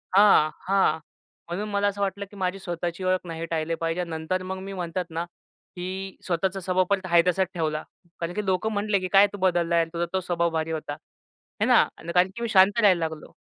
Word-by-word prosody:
हां, 195 Hz, -7 st, +6 dB, 0.2 s
हां, 190 Hz, -5 st, +3 dB, 0.5 s
म्हणून 200 Hz, +5 st, -4 dB
मला 205 Hz, 0 st, +1 dB
असं 200 Hz, 0 st, -2 dB
वाटलं 200 Hz, +1 st, -1 dB
की -, -, -13 dB
माझी 185 Hz, +1 st, -2 dB
स्वतःची 175 Hz, 0 st, -4 dB
ओळख 185 Hz, 0 st, +1 dB
नाही 165 Hz, 0 st, -4 dB
टाळले 165 Hz, 0 st, -2 dB
पाहिजे. 165 Hz, +2 st, -2 dB
आणि 170 Hz, -, -5 dB
नंतर 160 Hz, +3 st, -2 dB
मग 190 Hz, +1 st, -4 dB
मी 195 Hz, +1 st, -7 dB
म्हणतात 180 Hz, -1 st, -3 dB
ना, 165 Hz, +1 st, -3 dB, 0.5 s
की 190 Hz, +2 st, -5 dB
स्वतःचा 190 Hz, +2 st, -1 dB
स्वभाव 185 Hz, 0 st, +1 dB
पण 200 Hz, -1 st, +3 dB
आहे 170 Hz, -1 st, +5 dB
तासच 185 Hz, +1 st, +2 dB
ठेवला 155 Hz, -3 st, -1 dB, 0.4 s
कारण 170 Hz, +1 st, -3 dB
की 210 Hz, 0 st, -3 dB
लोकं 190 Hz, +4 st, 0 dB
म्हंटले 205 Hz, -1 st, +1 dB
की 185 Hz, -, -3 dB
"काय 200 Hz, +1 st, +8 dB
तू -, -, -5 dB
बदललाय, 170 Hz, -3 st, +2 dB
तुझा 170 Hz, +1 st, -1 dB
तो 190 Hz, -, +2 dB
स्वभाव 170 Hz, -1 st, 0 dB
भारी 160 Hz, 0 st, -2 dB
होता." 155 Hz, -2 st, -4 dB, 0.7 s
हे -, -, +4 dB
ना. -, -, +6 dB, 0.3 s
कारण 180 Hz, +1 st, +4 dB
की 235 Hz, -, -7 dB
मी 235 Hz, -, -1 dB
शांत 195 Hz, +2 st, +5 dB
राहायला 195 Hz, -5 st, +5 dB
लागलो. 160 Hz, -2 st, -4 dB
185 Hz, 210 wpm, -25 LUFS, 170-195 Hz, 0.7 s, काय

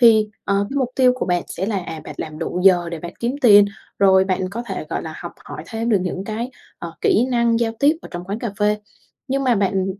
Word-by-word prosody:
Thì, 220 Hz, -3 st, +6 dB, 0.2 s
ờ, 200 Hz, 0 st, +1 dB
cái 280 Hz, -, -4 dB
mục 260 Hz, -3 st, +1 dB
tiêu 255 Hz, -1 st, +5 dB
của 255 Hz, -, -3 dB
bạn 175 Hz, -1 st, +1 dB
sẽ 190 Hz, +3 st, -4 dB
là, 210 Hz, -3 st, 0 dB
à, 165 Hz, -2 st, -7 dB
bạn -, -, -8 dB
làm 155 Hz, -1 st, -6 dB
đủ 175 Hz, +2 st, -3 dB
giờ 175 Hz, -3 st, +5 dB
để 170 Hz, -, -4 dB
bạn 170 Hz, +2 st, -7 dB
kiếm 240 Hz, +4 st, -1 dB
tiền, 205 Hz, -5 st, +8 dB, 0.3 s
rồi 190 Hz, -1 st, +5 dB
bạn 185 Hz, -1 st, -1 dB
có 235 Hz, +4 st, -4 dB
thể, -, -, -4 dB
gọi -, -, -2 dB
là, -, -, -7 dB
học -, -, -7 dB
hỏi -, -, -8 dB
thêm 225 Hz, 0 st, -3 dB
được 210 Hz, -4 st, +4 dB
những 185 Hz, +1 st, -3 dB
cái, 225 Hz, +4 st, -4 dB, 0.3 s
ờ, 170 Hz, -1 st, -7 dB
kỹ 235 Hz, -, +3 dB
năng 235 Hz, -1 st, +2 dB
giao 225 Hz, -1 st, +1 dB
tiếp 295 Hz, +3 st, +4 dB
ở -, -, -9 dB
trong 175 Hz, 0 st, -6 dB
quán 200 Hz, +3 st, -4 dB
cà 230 Hz, -2 st, -3 dB
phê, 210 Hz, 0 st, +2 dB, 0.5 s
nhưng 275 Hz, +1 st, 0 dB
mà 250 Hz, -2 st, +4 dB
bạn 195 Hz, -1 st, +1 dB
205 Hz, 260 wpm, -21 LUFS, 185-235 Hz, 0.5 s, tiền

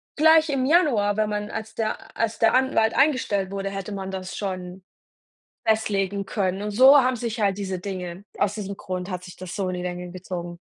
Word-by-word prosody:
gleich 320 Hz, 0 st, +5 dB
im 275 Hz, -2 st, 0 dB
Januar 250 Hz, -, +3 dB
wenn 215 Hz, -1 st, +1 dB
man 210 Hz, 0 st, -3 dB
als 220 Hz, 0 st, -6 dB
der 220 Hz, -1 st, -4 dB
als 225 Hz, 0 st, 0 dB
der 225 Hz, -1 st, +4 dB
Anwalt 240 Hz, -4 st, +2 dB
eingestellt 255 Hz, -9 st, +2 dB
wurde, 195 Hz, 0 st, -3 dB
hätte 195 Hz, +1 st, -5 dB
man 195 Hz, -1 st, -5 dB
das 190 Hz, 0 st, -6 dB
schon 185 Hz, -2 st, -5 dB, 0.8 s
festlegen 200 Hz, -3 st, +1 dB
können.“ 190 Hz, -1 st, -1 dB
Und 210 Hz, -, -2 dB
so 260 Hz, +6 st, +8 dB
haben 255 Hz, -1 st, +3 dB
sich 230 Hz, -1 st, -4 dB
halt 200 Hz, 0 st, +1 dB
diese 190 Hz, -2 st, -3 dB
Dinge 185 Hz, -1 st, -6 dB
aus 205 Hz, 0 st, +1 dB
diesem 200 Hz, -2 st, -5 dB
Grund 185 Hz, +1 st, -5 dB
hat 180 Hz, 0 st, -5 dB
sich 180 Hz, -2 st, -11 dB
das 185 Hz, -1 st, -7 dB
so 195 Hz, -3 st, -1 dB
in 185 Hz, -, -2 dB
die 180 Hz, -, -4 dB
Länge 180 Hz, 0 st, -5 dB
gezogen. 175 Hz, -1 st, -6 dB
200 Hz, 200 wpm, -24 LUFS, 185-225 Hz, 0.8 s, so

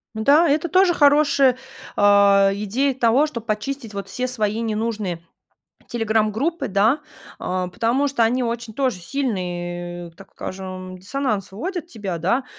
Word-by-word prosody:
М-да, 285 Hz, +10 st, +4 dB
это 310 Hz, +4 st, +1 dB
тоже 370 Hz, +1 st, +4 dB
хорошая, 285 Hz, -4 st, +4 dB, 0.4 s
а, 200 Hz, -1 st, +5 dB
идея 220 Hz, +8 st, 0 dB
того, 255 Hz, +4 st, +3 dB
чтоб 235 Hz, -7 st, -7 dB
почистить 225 Hz, +2 st, -3 dB
вот 200 Hz, -1 st, -5 dB
все 250 Hz, +6 st, -3 dB
свои 220 Hz, -3 st, -1 dB
ненужные 215 Hz, -6 st, -3 dB, 0.6 s
телеграм-группы, 225 Hz, +8 st, 0 dB
да, 215 Hz, +9 st, +2 dB, 0.4 s
э, 185 Hz, 0 st, -2 dB
потому 250 Hz, +8 st, +1 dB
что 275 Hz, -4 st, 0 dB
они 245 Hz, +3 st, +2 dB
очень 235 Hz, -1 st, -3 dB
тоже 260 Hz, -6 st, 0 dB
сильные 175 Hz, -7 st, -4 dB
так 195 Hz, +4 st, -16 dB
скажем, 185 Hz, -1 st, -7 dB
диссонанс 210 Hz, 0 st, -2 dB
вводят 340 Hz, -, -5 dB
тебя, 205 Hz, -, -5 dB
да. 195 Hz, +11 st, 0 dB
225 Hz, 135 wpm, -22 LUFS, 195-275 Hz, 0.6 s, а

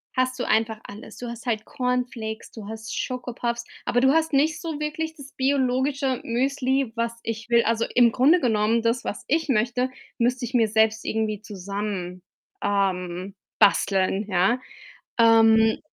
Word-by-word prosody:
hast 255 Hz, 0 st, 0 dB
du -, -, 0 dB
einfach 220 Hz, 0 st, +1 dB
alles. 205 Hz, +3 st, -11 dB
Du 245 Hz, -, -6 dB
hast 235 Hz, +1 st, -8 dB
halt 220 Hz, -3 st, -1 dB
Cornflakes, 250 Hz, -4 st, -3 dB
du 215 Hz, -3 st, -9 dB
hast 220 Hz, 0 st, -6 dB
Schokopuffs, 240 Hz, -1 st, -3 dB, 0.2 s
aber 245 Hz, -, +2 dB
du 265 Hz, +1 st, +5 dB
hast 320 Hz, -1 st, +1 dB
nicht 305 Hz, +2 st, +2 dB
so 320 Hz, -3 st, -4 dB
wirklich 315 Hz, +1 st, -3 dB
das 280 Hz, -3 st, -12 dB
biologische 265 Hz, 0 st, 0 dB
Müsli, 265 Hz, +1 st, 0 dB
was 230 Hz, 0 st, -1 dB
ich 225 Hz, 0 st, -5 dB
will. 235 Hz, -1 st, +5 dB
Also, 230 Hz, 0 st, +1 dB
im 240 Hz, -1 st, +6 dB
Grunde 290 Hz, +10 st, +4 dB
genommen 225 Hz, -3 st, +1 dB
das, 230 Hz, +1 st, +1 dB
was -, -, -5 dB
ich 320 Hz, +1 st, 0 dB
möchte, 245 Hz, +2 st, +1 dB, 0.3 s
müsste 245 Hz, +1 st, +1 dB
ich 240 Hz, -, -8 dB
mir 230 Hz, -3 st, +4 dB
selbst 220 Hz, +1 st, +2 dB
irgendwie 215 Hz, -2 st, -1 dB
zusammen 200 Hz, -2 st, -5 dB, 0.4 s
ähm, 190 Hz, -1 st, -1 dB, 0.2 s
basteln, 195 Hz, 0 st, +3 dB
ja. 190 Hz, +6 st, +2 dB, 0.6 s
Ähm, 225 Hz, -1 st, +5 dB
235 Hz, 155 wpm, -24 LUFS, 215-255 Hz, 0.6 s, im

